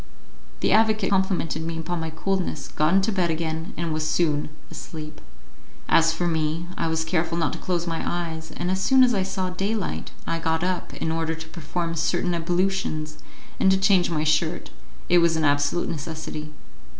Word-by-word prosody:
The -, -, +2 dB
advocate 215 Hz, -2 st, +3 dB
complimented 190 Hz, -5 st, +1 dB
me 165 Hz, 0 st, -3 dB
upon 170 Hz, +1 st, -3 dB
my 160 Hz, 0 st, -3 dB
coolness, 190 Hz, +3 st, -2 dB
got 155 Hz, +1 st, +1 dB
into 195 Hz, +3 st, +3 dB
bed 185 Hz, -4 st, +1 dB
again, 160 Hz, 0 st, -2 dB
and 170 Hz, -2 st, -1 dB
was 155 Hz, 0 st, -1 dB
soon 155 Hz, -2 st, +1 dB, 0.2 s
asleep. 155 Hz, -2 st, -8 dB, 0.7 s
As 165 Hz, 0 st, +5 dB
for 175 Hz, +2 st, -1 dB
me, 160 Hz, 0 st, 0 dB
I 165 Hz, -, -1 dB
was 160 Hz, 0 st, 0 dB
careful 165 Hz, 0 st, 0 dB
not 160 Hz, -3 st, +1 dB
to -, -, -6 dB
close 175 Hz, -2 st, -1 dB
my 165 Hz, -1 st, -2 dB
eyes, 160 Hz, -2 st, -3 dB
and 175 Hz, +2 st, -2 dB
as 190 Hz, 0 st, 0 dB
soon 265 Hz, +5 st, +6 dB
as 245 Hz, -1 st, +4 dB
I 195 Hz, -, +2 dB
saw 190 Hz, -1 st, -2 dB
daylight 195 Hz, +3 st, -2 dB, 0.2 s
I 165 Hz, 0 st, -1 dB
got 160 Hz, 0 st, 0 dB
up 180 Hz, -1 st, -1 dB
in 160 Hz, -, -2 dB
order 160 Hz, 0 st, -1 dB
to 160 Hz, 0 st, -9 dB
perform 165 Hz, +1 st, -3 dB
certain 175 Hz, +2 st, 0 dB
ablutions 170 Hz, -3 st, -1 dB, 0.4 s
and 190 Hz, -, +5 dB
to 190 Hz, -, +5 dB
change 190 Hz, -2 st, +4 dB
my 155 Hz, -3 st, 0 dB
shirt; 155 Hz, +2 st, +1 dB, 0.4 s
it 175 Hz, -, +5 dB
was 170 Hz, -1 st, +3 dB
an 160 Hz, -1 st, +1 dB
absolute 145 Hz, +3 st, +2 dB
necessity. 155 Hz, -1 st, -5 dB
165 Hz, 185 wpm, -25 LUFS, 160-185 Hz, 0.7 s, soon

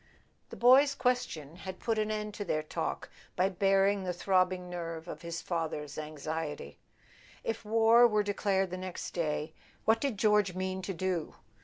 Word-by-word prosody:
The -, -, -8 dB
boy's 270 Hz, +4 st, +6 dB
question 175 Hz, -, -1 dB
had 190 Hz, 0 st, -7 dB
put 225 Hz, -2 st, 0 dB
an 215 Hz, 0 st, 0 dB
end 210 Hz, -1 st, -3 dB
to 205 Hz, -, -4 dB
their 155 Hz, -5 st, -1 dB
talk 155 Hz, -, -4 dB, 0.2 s
by 185 Hz, +2 st, +2 dB
baring 195 Hz, +1 st, +2 dB
the 180 Hz, -1 st, -2 dB
throbbing 185 Hz, 0 st, +1 dB
nerve 165 Hz, -2 st, -5 dB
of 155 Hz, -2 st, -7 dB
his 170 Hz, -1 st, -5 dB
father's 155 Hz, -4 st, -3 dB
anxiety. 155 Hz, 0 st, -5 dB, 0.6 s
If 225 Hz, 0 st, -3 dB
war 225 Hz, +2 st, +6 dB
were 210 Hz, -2 st, +2 dB
declared 195 Hz, -2 st, 0 dB
the 185 Hz, -, -3 dB
next 185 Hz, -1 st, -6 dB
day, 155 Hz, -1 st, -2 dB, 0.3 s
what 225 Hz, +1 st, +3 dB
did 275 Hz, -7 st, -1 dB
George 210 Hz, -3 st, +3 dB
mean 185 Hz, 0 st, -2 dB
to 195 Hz, +1 st, -4 dB
do? 180 Hz, -2 st, -2 dB
185 Hz, 165 wpm, -31 LUFS, 165-210 Hz, 0.6 s, boy's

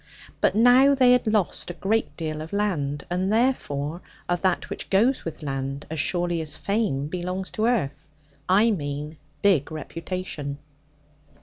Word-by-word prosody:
But -, -, +3 dB
now 250 Hz, +5 st, +6 dB
they 255 Hz, -2 st, +5 dB
had 250 Hz, -2 st, +3 dB
lost 210 Hz, -5 st, 0 dB
a 175 Hz, -, -5 dB
great 210 Hz, +7 st, -1 dB
deal 155 Hz, -2 st, -3 dB
of 160 Hz, +4 st, -8 dB
land, 150 Hz, -9 st, -1 dB
and 185 Hz, +2 st, 0 dB
therefore 175 Hz, -, 0 dB, 0.3 s
of 175 Hz, 0 st, 0 dB
that 185 Hz, -2 st, +1 dB
which -, -, -7 dB
goes 230 Hz, +7 st, +3 dB
with 160 Hz, -2 st, -6 dB
land, 135 Hz, 0 st, -3 dB
as 160 Hz, -, -3 dB
surely 175 Hz, +2 st, 0 dB
as 150 Hz, -2 st, -3 dB
fame 200 Hz, -10 st, 0 dB
belongs 180 Hz, +3 st, -4 dB
to 220 Hz, +1 st, 0 dB
earth 165 Hz, -, -1 dB, 0.4 s
I 210 Hz, +5 st, +5 dB
mean 150 Hz, -3 st, -4 dB, 0.3 s
big 175 Hz, -8 st, +3 dB
reputation. 155 Hz, -2 st, -5 dB
175 Hz, 150 wpm, -25 LUFS, 150-210 Hz, 0.4 s, now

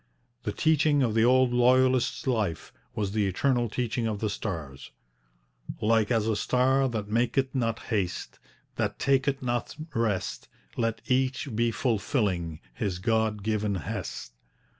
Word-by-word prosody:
The -, -, -2 dB
teaching 155 Hz, -3 st, +3 dB
of 115 Hz, -3 st, +1 dB
the 110 Hz, 0 st, +3 dB
old 130 Hz, 0 st, +4 dB
Loyalist's 130 Hz, +1 st, +3 dB
life 110 Hz, -, -1 dB, 0.2 s
was 100 Hz, -2 st, -1 dB
the 105 Hz, -1 st, +1 dB
eternal 120 Hz, +4 st, +1 dB
teaching 115 Hz, 0 st, -1 dB
of 110 Hz, -2 st, -2 dB
the 105 Hz, 0 st, -2 dB
stars: 75 Hz, -, -5 dB, 0.9 s
Like 110 Hz, 0 st, +2 dB
as 115 Hz, -3 st, +2 dB
a 110 Hz, -, +1 dB
star 130 Hz, +4 st, +2 dB
That 110 Hz, -4 st, -3 dB
maketh 120 Hz, +4 st, +1 dB
not 115 Hz, -4 st, 0 dB
haste, 95 Hz, -8 st, -3 dB, 0.4 s
That -, -, -1 dB
taketh 135 Hz, 0 st, +1 dB
not 120 Hz, -1 st, -2 dB, 0.2 s
rest, 110 Hz, -5 st, -1 dB, 0.3 s
Let 115 Hz, -1 st, -1 dB
each 130 Hz, -1 st, 0 dB
be 115 Hz, +1 st, +2 dB
fulfilling 100 Hz, -, -1 dB
His 90 Hz, +8 st, -2 dB
God 110 Hz, 0 st, 0 dB
given 105 Hz, -1 st, 0 dB
hest. 65 Hz, -7 st, -5 dB
115 Hz, 140 wpm, -27 LUFS, 105-130 Hz, 0.9 s, old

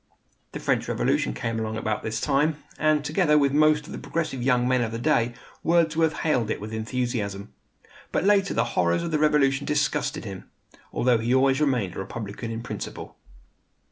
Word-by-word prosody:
The -, -, -5 dB
French -, -, 0 dB
Revolution 60 Hz, -, +1 dB
came 115 Hz, -, -2 dB
along 110 Hz, 0 st, -3 dB
about 110 Hz, -1 st, -2 dB
this 110 Hz, 0 st, -3 dB
time, 150 Hz, +3 st, +1 dB, 0.2 s
and, 155 Hz, -1 st, +2 dB
together 150 Hz, 0 st, +3 dB
with 140 Hz, -2 st, +3 dB
most 150 Hz, 0 st, +4 dB
of -, -, -11 dB
the -, -, -6 dB
progressive 155 Hz, -6 st, -3 dB
young 125 Hz, -1 st, +2 dB
men 130 Hz, -1 st, +2 dB
of 115 Hz, -2 st, -1 dB
the 115 Hz, -, -3 dB
day, 120 Hz, -3 st, +1 dB, 0.3 s
Wordsworth 165 Hz, -1 st, +2 dB
hailed 125 Hz, -8 st, +1 dB
it -, -, -2 dB
with 110 Hz, +2 st, -7 dB
enthusiasm. 110 Hz, -3 st, -3 dB, 0.6 s
But -, -, 0 dB
later 200 Hz, -1 st, +3 dB
the -, -, +3 dB
horrors 85 Hz, -, +2 dB
of 170 Hz, -, -3 dB
the 155 Hz, -, +1 dB
Revolution 140 Hz, -2 st, +2 dB
disgusted 150 Hz, -1 st, 0 dB
him; 95 Hz, -3 st, -8 dB, 0.4 s
although 125 Hz, -2 st, +2 dB
he 120 Hz, +3 st, +1 dB
always 135 Hz, +1 st, +3 dB
remained 125 Hz, -, +1 dB
a -, -, -5 dB
Republican 105 Hz, +3 st, -6 dB
in 115 Hz, 0 st, -5 dB
principle. -, -, -7 dB
130 Hz, 180 wpm, -25 LUFS, 115-150 Hz, 0.6 s, most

